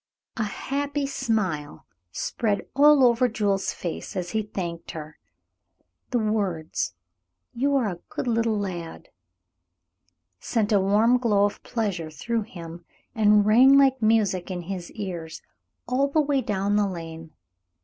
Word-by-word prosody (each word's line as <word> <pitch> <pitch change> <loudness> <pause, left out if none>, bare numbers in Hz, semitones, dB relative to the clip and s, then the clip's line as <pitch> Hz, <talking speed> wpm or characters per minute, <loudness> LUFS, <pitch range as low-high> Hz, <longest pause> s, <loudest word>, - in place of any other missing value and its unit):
A - - -3
happy 285 +6 -2
smile 190 - -2 0.3
spread 205 - -2
all 290 0 +6
over 245 0 +4
Jules's 205 -4 0
face 170 - -6
as 180 -1 -3
he 220 - 0
thanked 175 -5 -6
her. 155 0 -9 0.9
The 250 - 0
words, 195 - -1 0.6
"You 280 +4 +1
are 255 -5 +2
a 175 -4 -4
good - - -4
little 230 -2 +1
lad," 175 -5 -5 1.3
sent 220 -3 -1
a 205 - +5
warm 215 +6 +3
glow 210 -4 +3
of 205 - -3
pleasure 200 -9 -3
through 225 +10 -2
him, 170 -1 -9 0.3
and 210 -1 +4
rang 255 +6 +7
like 270 -2 +4
music 215 -5 +2
in 180 -2 -4
his 180 -1 -6
ears 175 -7 -6 0.4
all 260 +3 +2
the 280 +3 +1
way 285 -2 +2
down 205 -2 0
the 205 -1 +2
lane. 165 -3 -8
210 Hz, 140 wpm, -25 LUFS, 180-235 Hz, 1.3 s, rang